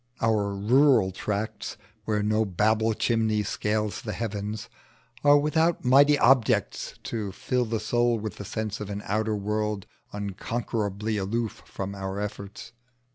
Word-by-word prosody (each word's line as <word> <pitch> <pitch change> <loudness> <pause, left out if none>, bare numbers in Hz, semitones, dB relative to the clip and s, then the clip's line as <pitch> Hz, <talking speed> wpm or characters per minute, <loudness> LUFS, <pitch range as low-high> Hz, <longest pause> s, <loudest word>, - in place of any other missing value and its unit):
Our 105 -3 +1
rural 115 0 +4
tracts 105 +4 -4 0.3
where 105 -1 0
no 110 +1 +2
Babel 110 +3 +1
chimney 110 -2 +1
scales 105 +1 -1
the 105 - -4
heavens 105 0 -4 0.6
are 145 0 +7
without 160 +2 +1
mighty 140 +3 +6
objects 125 -3 +2
to 105 -4 -3
fill 125 +6 -1
the 110 0 -2
soul 120 +2 +2
with 110 -1 -5
the - - -6
sense 110 0 -3
of 105 - -5
an 100 0 -5
outer 110 +1 0
world 105 0 -2 0.3
unconquerably 105 +1 -3
aloof 110 +3 -2
from 100 0 -5
our 95 0 -4
efforts. 105 +1 -6
110 Hz, 135 wpm, -26 LUFS, 100-115 Hz, 0.6 s, are